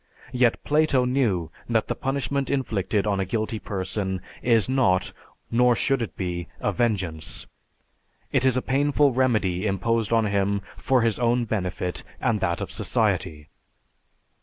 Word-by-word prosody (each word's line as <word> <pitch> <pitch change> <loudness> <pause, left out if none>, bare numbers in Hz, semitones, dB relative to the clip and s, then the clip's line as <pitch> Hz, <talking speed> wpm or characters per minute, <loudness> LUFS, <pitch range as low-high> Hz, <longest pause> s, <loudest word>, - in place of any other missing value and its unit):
Yet, 125 -2 +2
Plato 150 -4 +3
knew 115 - 0 0.2
that - - +1
the - - 0
punishment 140 0 -2
inflicted 110 -6 0
on 100 -2 0
a - - +1
guilty 110 +2 -2
person 95 -1 -3 0.2
is 115 -4 +3
not, 110 -9 +2 0.4
nor 125 +1 +4
should 135 0 +1
it 115 - -5
be, 90 -3 -3
a - - 0
vengeance; 95 -10 -2 0.9
it - - +2
is 130 -1 +4
a 130 - -1
painful 145 +1 +2
remedy 110 -7 +1
imposed 115 +3 0
on 115 -1 +3
him 100 0 0
for 130 -3 +2
his 115 -1 +1
own 120 0 +2
benefit 90 -4 -3 0.2
and 110 -2 +1
that 85 -3 0
of - - -4
society. 75 -2 -1
115 Hz, 145 wpm, -25 LUFS, 95-125 Hz, 0.9 s, nor